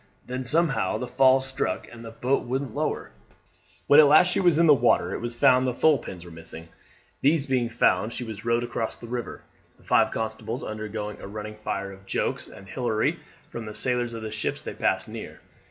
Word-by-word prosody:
Then 125 Hz, +1 st, -4 dB
somehow 155 Hz, +2 st, +1 dB
the 125 Hz, -, -4 dB
fall 130 Hz, +1 st, +5 dB
stuck 135 Hz, +1 st, -2 dB
and 120 Hz, -1 st, -11 dB
the 115 Hz, -, -7 dB
boat 125 Hz, +4 st, 0 dB
wouldn't 130 Hz, -1 st, -3 dB
lower. -, -, -2 dB, 0.7 s
When 145 Hz, -, +7 dB
at 150 Hz, -, +8 dB
last 180 Hz, +5 st, +6 dB
she -, -, +1 dB
was 175 Hz, -4 st, +4 dB
in 170 Hz, -, +5 dB
the 155 Hz, -, +8 dB
water 120 Hz, -3 st, +2 dB
it -, -, -4 dB
was 120 Hz, 0 st, -3 dB
found 130 Hz, +1 st, +4 dB
that 125 Hz, -, 0 dB
the -, -, -17 dB
thole 155 Hz, -4 st, +5 dB
pins 90 Hz, -6 st, -9 dB
were 85 Hz, -, -11 dB
missing; 80 Hz, 0 st, -7 dB, 0.5 s
these 145 Hz, +1 st, +3 dB
being 130 Hz, -4 st, 0 dB
found 110 Hz, -2 st, +2 dB
she 125 Hz, -, -4 dB
was 110 Hz, -3 st, -7 dB
rowed 115 Hz, 0 st, +1 dB
across 120 Hz, -2 st, -3 dB
the -, -, -11 dB
river, 120 Hz, +1 st, -5 dB, 0.3 s
the -, -, -23 dB
five -, -, +3 dB
constables 110 Hz, +1 st, -4 dB
undergoing 105 Hz, -1 st, -5 dB
a -, -, -7 dB
running 105 Hz, +1 st, -7 dB
fire 100 Hz, -2 st, -4 dB
of 95 Hz, 0 st, -14 dB
jokes -, -, -2 dB
and 95 Hz, -, -13 dB
hilarity 110 Hz, +2 st, -1 dB, 0.3 s
from 115 Hz, -2 st, -6 dB
the 105 Hz, -, -7 dB
sailors 120 Hz, +1 st, 0 dB
of 115 Hz, -1 st, -6 dB
the 110 Hz, -, -5 dB
ships 110 Hz, -, -3 dB
they -, -, -5 dB
passed -, -, 0 dB
near. -, -, -8 dB
120 Hz, 215 wpm, -26 LUFS, 110-130 Hz, 0.7 s, at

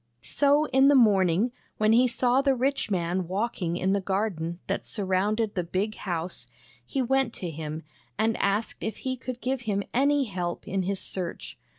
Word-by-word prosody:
So 290 Hz, +1 st, +3 dB
in 265 Hz, +1 st, +5 dB
the 285 Hz, -, +6 dB
morning, 205 Hz, -2 st, +4 dB, 0.3 s
when 215 Hz, 0 st, +3 dB
he 250 Hz, +2 st, +5 dB
saw 250 Hz, +2 st, +2 dB
the 275 Hz, -1 st, +2 dB
rich 265 Hz, -1 st, 0 dB
man 180 Hz, -1 st, -1 dB
walking 185 Hz, -3 st, -2 dB
in 190 Hz, +2 st, +1 dB
the 200 Hz, -, +1 dB
garden 185 Hz, -4 st, -2 dB
that -, -, -2 dB
surrounded 205 Hz, +2 st, 0 dB
the 180 Hz, -, -1 dB
big 190 Hz, +5 st, -1 dB
house, 175 Hz, -3 st, -3 dB, 0.4 s
he 270 Hz, -3 st, -2 dB
went 265 Hz, -1 st, +1 dB
to 175 Hz, -3 st, -5 dB
him, 155 Hz, +1 st, -5 dB, 0.3 s
and 220 Hz, +1 st, +2 dB
asked 200 Hz, +3 st, -1 dB
if 220 Hz, -, -3 dB
he 260 Hz, 0 st, 0 dB
could 255 Hz, -1 st, -7 dB
give 260 Hz, 0 st, -1 dB
him 200 Hz, 0 st, 0 dB
any 280 Hz, +3 st, +3 dB
help 180 Hz, -6 st, -4 dB
in 195 Hz, 0 st, 0 dB
his 190 Hz, +1 st, -1 dB
search. 180 Hz, -3 st, -5 dB
210 Hz, 180 wpm, -27 LUFS, 185-250 Hz, 0.4 s, the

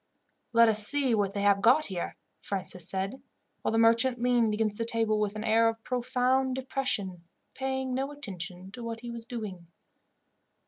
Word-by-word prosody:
"Let 230 Hz, 0 st, +6 dB
us 210 Hz, -1 st, +2 dB
see 280 Hz, -4 st, +2 dB
what 200 Hz, -3 st, +1 dB
they 200 Hz, -, -2 dB
have 200 Hz, -1 st, +4 dB
got 255 Hz, +8 st, +5 dB
here," 180 Hz, -3 st, -4 dB, 0.2 s
Francis 185 Hz, -3 st, -4 dB
said, 195 Hz, +7 st, -3 dB, 0.4 s
while -, -, 0 dB
the 225 Hz, -, +1 dB
merchant 230 Hz, +2 st, +4 dB
leaned 240 Hz, -2 st, +3 dB
against 210 Hz, 0 st, -1 dB
the -, -, +1 dB
table 225 Hz, -2 st, 0 dB
with 210 Hz, -1 st, -1 dB
an 215 Hz, -, -4 dB
air 225 Hz, +1 st, +4 dB
of 225 Hz, 0 st, -6 dB
profound 255 Hz, +1 st, +1 dB
depression, 250 Hz, -9 st, -2 dB, 0.3 s
paying 265 Hz, -1 st, -2 dB
no 270 Hz, +2 st, -2 dB
attention 190 Hz, -8 st, -7 dB
to 240 Hz, +4 st, -8 dB
what 230 Hz, -1 st, -5 dB
he 240 Hz, -1 st, -6 dB
was 230 Hz, -1 st, -8 dB
doing. 205 Hz, -8 st, -6 dB
225 Hz, 175 wpm, -29 LUFS, 205-250 Hz, 0.4 s, Let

